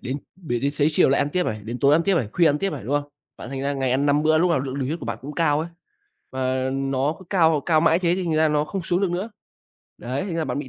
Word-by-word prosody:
Đến 130 +3 -4 0.2
để 155 -10 -3
đến 140 +3 0
xế 145 0 +1
chiều 150 - +4
lại 135 - +3
ăn 140 - +1
tiếp 180 +3 0
này, 110 0 -3
đến 120 +3 -5
tối 140 +1 +4
ăn 160 +3 +4
tiếp 195 +2 +2
này, 130 -11 0
khuya 170 - +3
ăn 145 - +1
tiếp 195 +3 -1
này, 140 -7 -6
đúng 135 +6 -1
không? 145 0 -14 0.3
Bạn - - -9
thành 135 -1 -4
ra 140 +1 0
ngày 135 -2 -1
ăn 135 +3 +1
5 145 +1 +3
bữa, 155 0 +3
lúc 175 +2 +2
nào 160 -6 +2
lượng 135 0 -5
đường 135 - -1
huyết 160 +5 -3
của 125 - -8
bạn 115 - -4
cũng 145 +3 -7
cao 150 -3 +2
ấy, 165 - -4 0.6
và 130 0 -1
nó 135 +2 -1
cứ 190 - -14
cao 160 -5 +3
cao 160 -2 +4
mãi 165 +1 +4
thế 175 -1 +1
thì 185 0 -3
thành 165 -2 -1
ra 155 0 +3
nó 150 0 +1
không 185 +5 -5
xuống 175 +2 0
được 195 -3 +1
nữa. 185 +6 -3 0.7
Đấy, 125 +5 -3
thành 185 -4 -4
ra 165 - -1
bạn - - -3
bị 145 -2 -5
150 Hz, 320 wpm, -23 LUFS, 135-170 Hz, 0.7 s, chiều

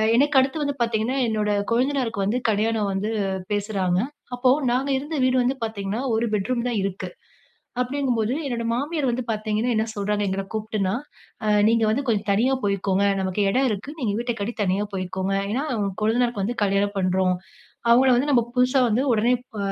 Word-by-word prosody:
எனக்கு 285 +2 +3
அடுத்து 270 +4 0
வந்து 285 -1 -1
பாத்தீங்கன்னா 230 +3 0
என்னோட 215 -1 0 0.2
கொழுந்தனாருக்கு 245 -4 0
வந்து 225 +5 +1
கல்யாணம் 215 -1 +1
வந்து 200 +3 -1 0.4
பேசுறாங்க. 195 -3 0 0.4
அப்போ 250 +1 +2 0.2
நாங்க 265 +3 0
இருந்த 295 +4 -5
வீடு 255 0 +3
வந்து 260 +2 +1
பாத்தீங்கன்னா, 215 +1 -3
ஒரு 230 +1 +1
பெட்ரூம் 235 +4 0
தான் 225 -4 -1
இருக்கு. 195 -1 -3 0.7
அப்பிடீங்கும்போது 250 -3 0
என்னோட 235 -3 -2
மாமியார் 285 +1 -1
வந்து 245 +1 -2
பாத்தீங்கன்னா, 215 +2 -1
என்ன 220 +1 +1
சொல்றாங்க 205 0 0
எங்கள 195 +1 -2
கூப்ட்டுன்னா, 215 -2 -1 0.5
அ - - +1 0.2
"நீங்க 230 -1 +3
வந்து 270 +5 0
கொஞ்சம் 210 -2 0
தனியா 250 +7 +2
போய்க்கோங்க. 200 0 +1 0.2
நமக்கு 190 +2 -1
எடம் 260 +4 +2
இருக்கு. 215 +8 -4
நீங்க 210 -5 0
வீட்ட 240 0 -2
கட்டி 230 +4 -2
தனியா 195 +3 +1
போய்க்கோங்க. 190 +1 -2 0.2
ஏன்னா 265 +7 -1 0.4
கொழுந்தனாருக்கு 235 -1 +1
வந்து 240 +3 -2
கல்யாணம் 200 +1 0
பண்றோம். 185 0 +1 0.5
அவங்கள 255 +2 +6
வந்து 275 +4 +1
நம்ம 240 -4 +4
புதுசா 255 +2 +3
வந்து 230 +4 +1
ஒடனே 230 +3 +3 0.2
ப - - -6
225 Hz, 165 wpm, -23 LUFS, 200-250 Hz, 0.7 s, அவங்கள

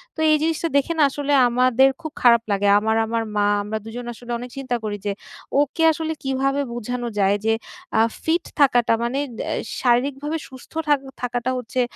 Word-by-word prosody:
তো - - -10
এই 305 - +5
জিনিসটা 325 +1 0
দেখে 280 +4 +1
না - - +6
আসলে 290 +1 -1 0.2
আমাদের 255 +2 +4
খুব 315 -2 -6
খারাপ 235 -2 +6
লাগে। 200 0 +1
আমার 220 +1 0
আমার 230 0 -1
মা, 205 - +3 0.2
আমরা 210 +2 -3
দুজন 240 +2 -7
আসলে 240 +1 -10
অনেক 245 +1 -7
চিন্তা 260 -2 -2
করি 210 -1 -3
যে 205 - 0 0.5
ওকে 290 +3 -1
আসলে 320 0 -3
কীভাবে 270 +1 0
বুঝানো 240 +1 -4
যায় 195 0 +3
যে, 225 - +3 0.5
আ - - +6 0.2
ফিট 335 +2 +1 0.2
থাকাটা 245 -5 +4
মানে 250 +4 -1
অ্যা 235 - -4 0.3
শারীরিকভাবে 275 +5 +1
সুস্থ 260 -1 -14 0.2
থাক 290 -2 +4 0.2
থাকাটা 245 0 -1
হচ্ছে 250 +1 -2
250 Hz, 180 wpm, -22 LUFS, 235-280 Hz, 0.5 s, না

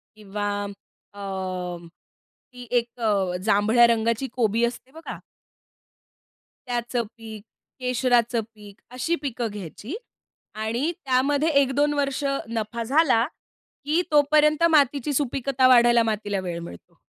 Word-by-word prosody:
किंवा 205 -1 -5 0.7
अ, 200 - -10 1.3
ती 245 -1 -10
एक 235 +1 -10
अ, 200 -5 +1
जांभळ्या 220 +3 +5
रंगाची 230 +2 +1
कोबी 230 -1 +1
असते 245 +2 -6
बघा. 325 +3 -8 1.5
त्याचं 240 0 -1
पीक, 220 -2 -9 0.4
केशराचं 245 -2 +1
पीक, 205 -1 -14
अशी 250 +7 -1
पिकं 250 -5 -3
घ्यायची 205 - -7 0.6
आणि 230 +8 -1
त्यामध्ये 275 +4 +2
1-2 285 +2 +1
वर्ष 280 -1 -1 0.3
नफा 230 +1 -3
झाला, 265 -2 +3 0.6
की 310 +4 +2
तोपर्यंत 300 +2 +4
मातीची 290 -2 +2
सुपीकता 270 -1 +1
वाढायला 240 -2 +6
मातीला 210 -2 -2
वेळ 175 -2 -4
मिळतो. 170 - -12
240 Hz, 110 wpm, -24 LUFS, 220-275 Hz, 1.5 s, वाढायला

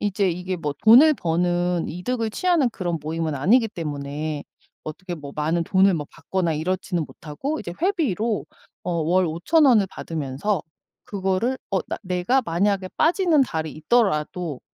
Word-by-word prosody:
이제 200 -1 +1
이게 180 +2 -3
뭐 150 -4 -3
돈을 265 +8 +8
버는 175 - 0
이득을 225 +6 -2
취하는 340 0 +2
그런 175 -6 -3
모임은 160 +1 -2
아니기 220 - +3
때문에 150 -3 -4 0.4
어떻게 175 +4 -6
뭐 145 -4 -9
많은 160 +3 0
돈을 190 +2 +4
뭐 150 -3 -3
받거나 185 -3 -2
이렇지는 175 +2 -2
못하고 265 - -5
이제 175 -8 -6
회비로 245 - 0 0.4
어 - - -2
월 170 +3 +2
5,000 175 - +2
원을 230 -8 +5
받으면서 155 +5 -3 0.4
그거를 195 +6 -1
어 195 - +2
나 - - -2
내가 185 +8 +1
만약에 190 +1 0
빠지는 335 -1 +3
달이 160 - -3
있더라도 160 - 0
180 Hz, 315 characters per minute, -23 LUFS, 160-220 Hz, 0.4 s, 돈을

